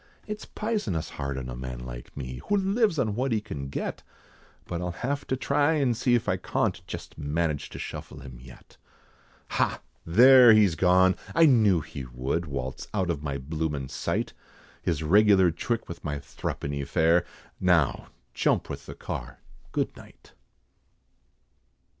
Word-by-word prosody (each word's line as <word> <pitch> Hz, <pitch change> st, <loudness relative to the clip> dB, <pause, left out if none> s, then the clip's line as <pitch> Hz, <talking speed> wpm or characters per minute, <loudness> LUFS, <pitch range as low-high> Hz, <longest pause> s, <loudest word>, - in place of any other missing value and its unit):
It's 210 Hz, 0 st, -6 dB
pisonous 210 Hz, -, -2 dB
hard 70 Hz, -1 st, -4 dB
on 65 Hz, -1 st, -5 dB
a 60 Hz, -, -6 dB
man 65 Hz, -1 st, -6 dB
like -, -, -9 dB
me, 65 Hz, -2 st, -6 dB
Who 205 Hz, -, +4 dB
lives 200 Hz, -1 st, +2 dB
on 110 Hz, -6 st, +1 dB
what 130 Hz, +4 st, -1 dB
he 110 Hz, -, +2 dB
can 70 Hz, -9 st, -6 dB
get, 70 Hz, -, -4 dB, 0.6 s
But 85 Hz, 0 st, -4 dB
I'll 90 Hz, -1 st, -3 dB
have 145 Hz, +2 st, -2 dB
to 130 Hz, -, 0 dB
try 145 Hz, +4 st, +2 dB
and 135 Hz, -6 st, +2 dB
see 120 Hz, +1 st, +2 dB
if 120 Hz, -, -1 dB
I -, -, +1 dB
cawnt, -, -, -1 dB
Jest -, -, -8 dB
manage 75 Hz, 0 st, -1 dB
to -, -, -9 dB
shuffle -, -, -7 dB
him 65 Hz, -2 st, -10 dB
yet. 60 Hz, -1 st, -15 dB, 0.7 s
Ha! -, -, 0 dB, 0.2 s
there, 125 Hz, +6 st, +8 dB
he's 105 Hz, -5 st, +5 dB
gone! 90 Hz, +2 st, +4 dB, 0.2 s
I 165 Hz, 0 st, +7 dB
knew 110 Hz, -, +5 dB
that -, -, -13 dB
he 70 Hz, -, -6 dB
would, 65 Hz, +7 st, -3 dB
Waltz 65 Hz, -2 st, -5 dB
out 95 Hz, -4 st, +1 dB
of 75 Hz, -4 st, -4 dB
my 70 Hz, -2 st, -3 dB
bloomin' 75 Hz, -1 st, -3 dB
sight! -, -, -2 dB, 0.5 s
His 80 Hz, -2 st, -1 dB
regular 95 Hz, +1 st, +5 dB
trick 115 Hz, +8 st, -2 dB
with 85 Hz, -, -8 dB
my 75 Hz, -2 st, -2 dB
thruppeny 70 Hz, 0 st, -4 dB
fare, 80 Hz, +5 st, +3 dB, 0.4 s
Now 90 Hz, -6 st, +2 dB, 0.3 s
jump -, -, +1 dB
with -, -, -7 dB
the -, -, -8 dB
car, -, -, -6 dB, 0.3 s
good -, -, -1 dB
night." -, -, -16 dB
85 Hz, 165 wpm, -27 LUFS, -, 0.7 s, there